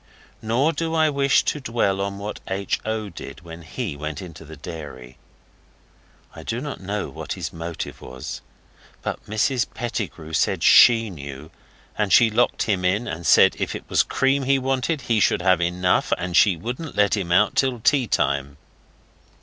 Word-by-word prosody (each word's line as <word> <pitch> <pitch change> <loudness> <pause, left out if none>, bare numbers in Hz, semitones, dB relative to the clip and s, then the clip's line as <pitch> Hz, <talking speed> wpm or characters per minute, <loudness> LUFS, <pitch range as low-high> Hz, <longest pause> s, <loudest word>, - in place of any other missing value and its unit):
Nor 125 +9 +1
do 165 0 -2
I 155 -1 +3
wish 140 -1 +3
to 150 - -1
dwell 115 -6 0
on 100 0 -3
what 105 +1 -6
H. 100 +1 -2
O. 110 -1 -2
did 85 - -10
when 85 -1 -10
he 80 -2 -5
went 75 0 -5
into 80 -4 -10
the 80 0 -11
dairy. 70 -5 -9 1.2
I - - -9
do 115 - -3
not 145 -3 -6
know 100 +2 -3
what - - -6
his - - -6
motive 85 0 -6
was. 65 0 -7 0.6
But - - -4
Mrs 120 +4 0
Pettigrew 105 -9 -5
said - - +1
SHE 115 -3 +6
knew; 70 -1 -9 0.4
and 105 -2 -1
she 115 +4 +6
locked 120 +3 +1
him 95 -4 -1
in, 100 +6 +1
and 85 0 -4
said - - +6
if - - -2
it - - -8
was - - +4
cream 135 +1 +1
he 135 +1 +3
wanted 135 +3 -1
he 115 -4 +1
should 90 - +2
have 90 -2 +3
enough, 90 +1 +1
and 90 -1 -4
she 95 -3 +5
wouldn't 125 - -6
let 105 +1 +3
him 95 -4 -3
out 100 +4 +3
till 130 -3 +1
tea 130 +2 +2
time. 70 -3 -1
100 Hz, 175 wpm, -23 LUFS, 85-120 Hz, 1.2 s, SHE